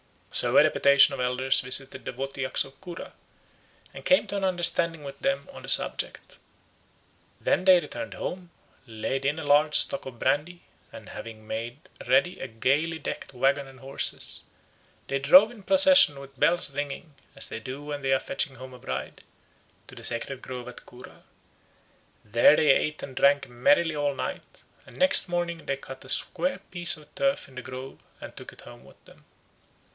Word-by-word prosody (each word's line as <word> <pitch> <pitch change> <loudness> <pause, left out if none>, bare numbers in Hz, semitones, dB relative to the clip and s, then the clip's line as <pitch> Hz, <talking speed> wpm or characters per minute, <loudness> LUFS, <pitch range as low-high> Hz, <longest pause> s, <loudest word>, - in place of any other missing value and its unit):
So - - +2
a - - +8
deputation 140 0 +5
of - - -6
elders 125 +1 +1
visited 130 +1 +1
the - - -5
Wotyaks 135 +1 -2
of 135 - -17
Cura 175 -3 -9 0.8
and - - -10
came 275 - +4
to 200 - -3
an 195 - -4
understanding 170 -3 +1
with 140 -1 -9
them 275 0 -1
on - - -12
the - - -11
subject. - - 0 1.0
Then 185 - 0
they 185 -2 +7
returned 290 +11 -7
home, 180 -1 -6 0.4
laid 120 +4 -4
in 145 +3 0
a 160 - -5
large 150 +1 +3
stock 185 - +3
of 125 -3 -10
brandy, 150 +8 -1 0.3
and - - -12
having 110 -1 -10
made 115 +3 -5 0.3
ready 135 +8 +2
a - - -5
gaily 140 +8 0
decked 160 - -7
waggon 135 +2 0
and 135 -1 -16
horses, 135 +1 +1 0.7
they 140 - -1
drove 185 - +6
in 235 -4 -14
procession 280 - +5
with 135 -1 -14
bells 175 -5 +1
ringing, 145 +3 -6 0.2
as 135 - -4
they - - -6
do 130 +5 -8
when 145 -1 -6
they 135 0 +1
are 135 - +2
fetching 135 0 -3
home 130 0 -11
a 125 - -13
bride, 65 - -6 0.7
to - - -11
the - - -8
sacred 125 +3 -2
grove 125 -1 -8
at 125 - -11
Cura. 125 +1 -15 1.0
There 115 +7 +5
they 150 -2 +4
ate 150 +3 0
and 130 - -8
drank 140 -1 +3
merrily 160 +6 +2
all 145 -1 -1
night, - - -7 0.2
and - - -15
next 280 -4 +4
morning 175 -2 -3
they 135 - -2
cut 135 -1 -11
a - - -10
square 180 +6 +2
piece 175 -2 0
of 150 -1 -18
turf 275 0 -1
in 135 - -18
the 130 - -6
grove 130 +1 -9 0.2
and - - -10
took - - -10
it - - -14
home - - -14
with - - -20
them. - - -20
140 Hz, 180 wpm, -26 LUFS, 130-170 Hz, 1.0 s, a